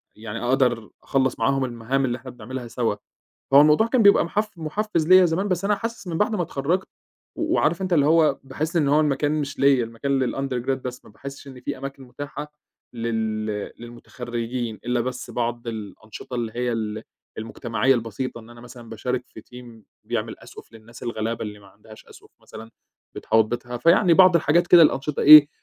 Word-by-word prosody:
يعني 110 +1 -7
أقدَر 125 -3 +1
أخلّص 130 -2 0
معاهم 135 +3 +1
المهام 125 +3 -2
اللي 120 0 -2
إحنا 130 0 -10
بنعملها 125 +1 -8
سوا، 115 -3 -1 0.6
هو 140 - +9
الموضوع 155 +9 +4
كان 240 -1 +2
بيبقى 200 -3 +6
محف 210 +5 -2
محفّز 165 +1 -2
ليَّ 185 0 +7
زمان، 175 +5 -1
بس 185 0 -1
أنا 210 +1 +2
حاسس 230 0 -6
من 165 -2 -3
بَعد 215 +1 +1
ما 185 - -1
اتخرّجت 165 +4 -2 0.5
و 320 0 -1
وعارف 170 +4 +1
أنت، 185 -2 -1
اللي 145 -3 +4
هو 155 -3 +3
باحس 150 +5 -4
إن 150 -4 +2
هو 150 +2 +4
المكان 145 0 +1
مش 140 -1 -6
ليَّ 135 -3 +4
المكان 125 +5 -2
للundergrad 135 -1 -2
بس 125 0 -7
ما - - -16
باحسّش 140 +4 -10
إن 130 -2 -11
في - - -4
أماكن 135 0 -8
مُتاحة 145 +3 -8 0.4
لل 110 -2 -2 0.3
للمُتخرّجين 120 -1 -6
إلّا 120 0 0
بس 125 +1 -5
بعض 120 0 -3
الأنشطة 110 +1 -8
اللي 115 -2 -3
هي 125 0 -1
ال 110 -1 -4 0.3
المُجتمعيّة 115 +3 0
البسيطة، 115 +2 -4
إن 115 0 -15
أنا 120 0 -14
مثلًا 120 -1 -12
باشارك 125 +3 -3
في - - -13
team 120 -2 -14 0.2
بيعمل - - -4
أسقُف - - -14
للناس 115 +2 -13
الغلابة 115 -1 -3
اللي 105 -1 -7
ما 100 - -18
عندهاش 105 +3 -16
أسقُف - - -17
مثلًا 115 +1 -12 0.4
بتحاوط 110 -1 +2
بيتها، 120 +2 -5
فيعني 170 - +4
بعض 185 0 +6
الحاجات 170 +2 +3
كده 175 - +8
الأنشطة 150 -2 +2
إيه، 150 -1 +10
130 Hz, 185 wpm, -23 LUFS, 115-150 Hz, 0.6 s, إيه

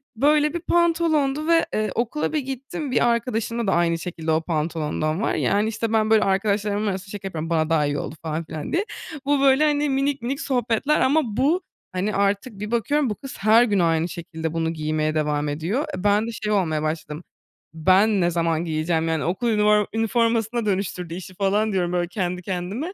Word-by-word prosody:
Böyle 295 +4 +3
bir 345 - -2
pantolondu 325 -4 +1
ve, 335 -1 +4
eee, 215 0 0
okula 245 +7 -1
bir 305 - +2
gittim, 270 +1 -5
bir 240 - +3
arkadaşımda 235 -1 -1
da - - +2
aynı 170 -1 +2
şekilde 160 -2 -4
o 160 +1 +2
pantolondan 155 +1 -2
var. - - 0
Yani, 210 +2 +1
işte, 225 +1 -3
ben 215 0 +2
böyle, 220 -1 +5
arkadaşlarımın 205 +2 0
arasında 195 0 -4
şaka 195 -2 -6
yapıyorum, 165 -2 -5
bana 160 -1 +1
daha 155 -2 +2
iyi 145 0 -1
oldu 155 - -5
falan 160 +1 -3
filan 155 -1 -6
diye. 390 +5 +1 0.4
Bu 285 -1 +2
böyle, 275 +2 +5
hani, 295 -1 +2
minik 275 0 0
minik 270 +4 -3
sohbetler 250 +2 +1
ama 300 +4 +4 0.2
bu, 320 +8 +2 0.3
hani, 190 +3 -2
artık 200 +2 0
bir 210 +2 -5
bakıyorum 260 +4 +1
bu 210 - -2
kız 270 +6 -9
her 220 +4 +5
gün 205 -5 +1
aynı 165 0 +2
şekilde 160 -2 -5
bunu 165 0 -1
giymeye 155 0 -1
devam 150 -1 0
ediyor. 170 - -1
E, 180 - -6
ben 205 +2 +3
de - - -3
şey 215 -1 -4
olmaya 160 -6 0
başladım, 155 +1 -4 0.5
ben 190 +5 +3
ne 175 0 +2
zaman 165 0 0
giyeceğim, 160 +1 0
yani, 160 -2 0
okul 185 +8 -1
ünivor 210 -1 +3
üniformasına 230 0 +1
dönüştürdü 185 -4 -2
işi 185 +1 -8
falan 205 +2 +1
diyorum, 180 -2 0
böyle, 175 -1 0
kendi 180 -1 -3
kendime. 195 - -4
205 Hz, 195 wpm, -23 LUFS, 165-240 Hz, 0.5 s, böyle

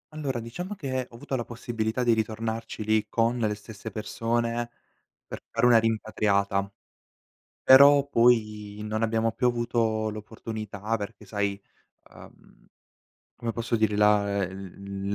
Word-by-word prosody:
Allora, 135 -5 -2
diciamo 180 - -6
che 130 -5 -3
ho - - -15
avuto 125 +3 -4
la 120 - -1
possibilità 115 0 -3
di 120 -1 +4
ritornarci 110 0 -3
lì, 110 0 +1
con 115 +1 +1
le 105 -2 0
stesse 105 +1 -9
persone 115 +2 -2 0.6
per - - -8
fare - - +1
una 120 -2 +7
rimpatriata, 100 -3 0 0.9
però 140 +1 +8
poi 105 -5 +2
non 110 +1 -2
abbiamo 115 0 +1
più 125 - 0
avuto 115 -2 0
l'opportunità 110 0 -5
perché 105 0 -8
sai, 100 -2 -2 0.5
uhm, - - -17 0.7
come 120 -1 -3
posso 115 +1 -1
dire, 110 -2 +1
la 100 -1 +3
ehm, 90 - -4
l 100 +1 -7
110 Hz, 135 wpm, -27 LUFS, 105-120 Hz, 0.9 s, però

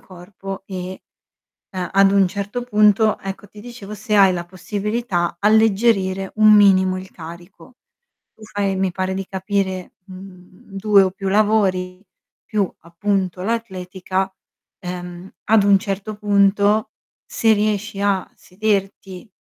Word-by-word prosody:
corpo 190 +1 -9
e, 185 -1 -7 0.7
ehm, 185 -2 -4
ad 195 0 +5
un 195 -1 +4
certo 200 +6 -4
punto, 215 -2 +3
ecco, 195 +1 -7
ti 210 +1 -15
dicevo 235 -3 -10
se 215 +1 -2
hai 195 -2 +6
la 175 -1 -4
possibilità 195 -1 -3
alleggerire 200 -3 +2
un 215 0 +6
minimo 190 -2 +5
il 185 0 -9
carico. 175 +8 -12 0.6
Tu 220 - -17
fai, 200 -2 -2
mi 190 -1 0
pare 185 +1 -2
di 195 0 -4
capire, 190 -1 -3
mhmm, 185 0 -14
2 205 0 +5
o 185 - 0
più 195 +1 -6
lavori 195 -3 +1 0.5
più, 205 -3 +1
appunto, 185 +1 -2
l'atletica, 190 -3 -3 0.5
ehm, 180 -1 -7 0.2
ad 220 -1 +4
un 200 -1 +5
certo 200 +1 -4
punto 205 +1 +2 0.3
se 225 -1 +1
riesci 210 -1 -1
a 200 -2 0
sederti 195 -1 -3
195 Hz, 130 wpm, -20 LUFS, 185-210 Hz, 0.7 s, hai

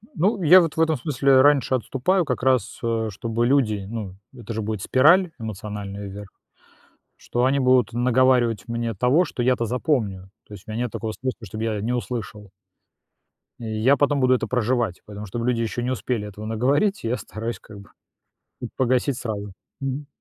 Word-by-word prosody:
Ну, 195 +5 +1
я 180 +4 +8
вот 165 -2 -2
в - - +2
этом 160 -1 +3
смысле 135 -1 +3
раньше 140 -2 +4
отступаю 135 - 0
как 125 -3 -2
раз, 130 -6 +1
а, 115 -1 -1
чтобы 115 +3 -2
люди 115 -7 +1
ну, 105 -5 -6 0.2
это 120 -3 -8
же 110 - -3
будет 105 -1 -3
спираль 165 - +4
эмоциональная 105 -2 -6
вверх. 100 0 -9 0.9
Что 120 +1 -2
они 135 +2 +2
будут 125 -2 +3
наговаривать 120 -1 +2
мне 115 0 -2
того, 125 - +3
что 130 - -4
я-то 125 -1 +2
запомню. 115 -6 -1 0.2
То - - -16
есть 100 0 -12
у - - -9
меня 110 +3 -2
нет 120 - -4
такого 110 -1 -4
способа, 125 -1 -5
чтоб 110 +3 -7
я 110 -2 -1
не 115 +4 -2
услышал. 115 -4 -5 1.1
И 115 - -7
я 110 +5 +2
потом 145 +1 +2
буду 130 -1 +4
это - - -2
проживать. 120 -5 0
Поэтому, 105 0 -8
чтобы 115 +4 -4
люди 120 -2 +1
ещё 115 +1 -2
не 125 - -2
успели 120 -4 -2
этого 105 +1 -9
наговорить, 135 - +1
я 115 +2 -1
стараюсь 115 +4 -6
как 105 -2 -13
бы, 100 - -15 0.7
м, - - -3
погасить 130 +1 +1
сразу, 105 -5 -5 0.3
мгм. 135 +1 -4
120 Hz, 185 wpm, -23 LUFS, 110-130 Hz, 1.1 s, я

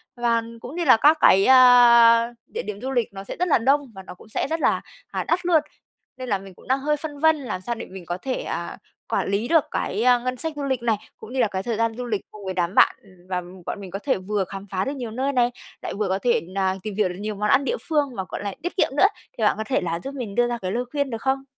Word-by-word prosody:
và 235 -1 +1 0.2
cũng 270 +7 -8
như 345 -2 -1
là 255 - +7
các 300 +6 +5
cái, 195 +1 +6
a, 240 -2 +7
địa - - -5
điểm 210 +1 -6
du 265 +1 -3
lịch 240 -5 -1
nó 195 0 -7
sẽ - - -7
rất 360 - +1
là 305 - +4
đông 270 +2 +1
và 190 - -9
nó 185 - -10
cũng 220 - -17
sẽ - - -2
rất 325 +1 -2
là, - - +2 0.3
à, - - -3
đắt 350 +1 0
luôn. 330 -4 +4 0.6
Nên 255 -1 -6
là 200 - +2
mình 195 -1 -12
cũng - - -18
đang 265 +1 +2
hơi 300 +2 0
phân 290 -1 -7
vân 320 0 +4
làm 215 -9 -5
sao 235 +5 -3
để - - -7
mình 185 -2 -11
có 175 +2 -3
thể, 260 +5 -3
à, - - -5 0.3
quản - - 0
lý 210 +4 0
được 325 -2 +4
cái, 210 +4 -2
a, 250 -1 +5
ngân 255 +1 -3
sách 320 +3 -3
du 290 - -4
lịch 260 -3 -1
này, 225 -2 +2 0.2
cũng 220 +3 -11
như 265 - -2
là 235 - +4
cái 190 -1 -4
thời 230 -3 -2
gian 230 -1 0
du 250 - -4
lịch 215 -4 -2
cùng 210 -2 -11
với 190 - -3
đám 175 0 -1
bạn - - +6 0.3
và 180 -1 -1 0.2
bọn 205 - -5
mình 185 -2 -9
có 195 - -4
thể 265 0 0
vừa 195 +1 -2
khám 195 +2 -9
phá 190 +2 -2
được 275 - -2
nhiều 240 -4 -5
nơi 270 +4 -1
này, 245 -1 +3 0.3
lại - - -5
vừa 210 -1 -1
có 190 +1 0
thể 240 +1 +2
nà 190 0 0
tìm 210 -2 -5
hiểu 205 -4 +1
được 180 - -6
nhiều 210 0 -4
món 210 +1 -1
ăn 275 - +4
địa 485 - -1
phương 290 -5 +1
và, 190 - -3
gọi - - -5
là, 200 - -3
tiết 355 - -4
kiệm - - +3
nữa. 390 - +7 0.3
Thì 220 - -2
bạn 210 - +4
có 220 - -2
thể 270 - +1
là 170 -1 -2
giúp 275 +1 -6
mình 225 -7 -5
đưa 240 0 +3
ra 240 0 -2
cái 185 0 -3
lời 245 +3 -1
khuyên 285 -2 -1
được 225 -1 -5
không? 270 0 0
235 Hz, 295 wpm, -23 LUFS, 200-270 Hz, 0.6 s, là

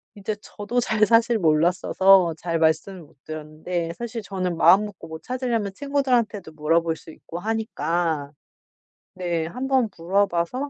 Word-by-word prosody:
이제 205 +1 -4
저도 215 +4 -3
잘 220 -3 +2
사실 230 +1 +4
몰랐어서 175 +2 +4
잘 165 0 -2
말씀을 165 +4 +1
못 150 - -20
드렸는데 155 +2 -4
사실 235 +2 -5
저는 185 -4 -3
마음 195 +5 +6
먹고 185 -5 -10
뭐 160 0 -8
찾으려면 240 -5 -2
친구들한테도 250 - 0
물어볼 165 +2 +1
수 160 - -13
있고 170 +2 -9
하니까 175 -8 -1 0.8
네. 175 -3 -2
한번 260 +3 0
물어봐서 195 +8 0
185 Hz, 310 characters per minute, -24 LUFS, 165-225 Hz, 0.8 s, 마음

